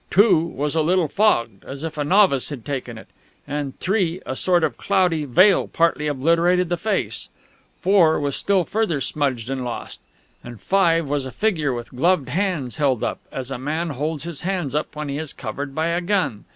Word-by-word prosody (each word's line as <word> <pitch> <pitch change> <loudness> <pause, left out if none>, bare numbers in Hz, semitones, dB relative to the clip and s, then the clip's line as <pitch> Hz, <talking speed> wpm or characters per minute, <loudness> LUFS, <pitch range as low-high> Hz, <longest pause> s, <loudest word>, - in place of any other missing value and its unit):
"2" 205 -3 +5
was 150 -3 -3
a 160 - +2
little 175 +1 +2
fogged, 120 - +1
as 140 +2 -8
if 165 -1 -4
a 150 - -1
novice 180 -4 +3
had 135 -7 -8
taken 130 -5 -4
it; - - -11 0.4
on 145 -2 -3
"3" 185 -3 0
a 130 - -4
sort 175 +3 +2
of - - 0
cloudy 180 -6 +1
veil 185 - +4
partly 165 -2 +1
obliterated 170 +5 +2
the 175 - +1
face; 210 +3 -2 0.5
"4" 180 -4 +4
was 145 -1 -1
still 195 -2 +2
further 200 -5 -1
smudged 135 -5 -1
and 135 -1 -3
lost; 120 -1 -6 0.4
and 120 -2 -10
"5" 170 -5 +2
was 140 -1 -1
a - - -7
figure 160 - 0
with 120 -1 -6
gloved 150 -1 +2
hands 160 - -1
held 135 -6 +1
up, - - -2
as 130 0 -5
a 135 - -4
man 155 +5 -2
holds 150 +2 -3
his 170 -4 -5
hands 180 -7 -2
up 150 +1 -2
when 150 0 -4
he 140 +1 -3
is 155 -2 -4
covered 135 +4 -6
by 160 +1 0
a 170 +1 0
gun. 180 - -1
155 Hz, 195 wpm, -22 LUFS, 135-180 Hz, 0.5 s, 2